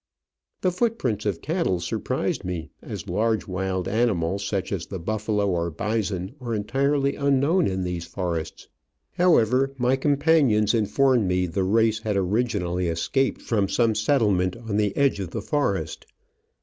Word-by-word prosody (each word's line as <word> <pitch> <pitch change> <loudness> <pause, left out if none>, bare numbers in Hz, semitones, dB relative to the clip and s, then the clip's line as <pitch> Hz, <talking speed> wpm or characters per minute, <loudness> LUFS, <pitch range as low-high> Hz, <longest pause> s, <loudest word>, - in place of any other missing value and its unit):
The 185 - +2
footprints 170 - -1
of 100 -5 -2
cattle 160 - 0
surprised 85 - -2
me, 85 -3 -5
as - - -7
large 110 0 0
wild 95 -1 -2
animals 100 -4 0
such 100 -2 -2
as 95 -5 -3
the 95 - -6
buflalo 105 +2 -1
or 85 -2 0
bison 100 +2 -2
are 120 -2 -2
entirely 140 +6 0
unknown 140 +5 +2
in 95 -1 -2
these 90 -2 -3
forests. 85 -4 -4 0.4
However, 135 -6 +3
my 125 +1 +2
companions 140 -6 +3
informed 120 +1 +2
me 90 0 +1
the 95 +2 -1
race 110 +3 +2
had 110 -2 -1
originally 95 -3 0
escaped 85 +11 0
from 100 -4 0
some 115 +2 +2
settlement 105 -4 +1
on 115 -3 -3
the 105 -2 0
edge 140 -6 +2
of 95 -4 -4
the 115 - -4
forest. 120 -10 -1
105 Hz, 150 wpm, -24 LUFS, 95-130 Hz, 0.4 s, However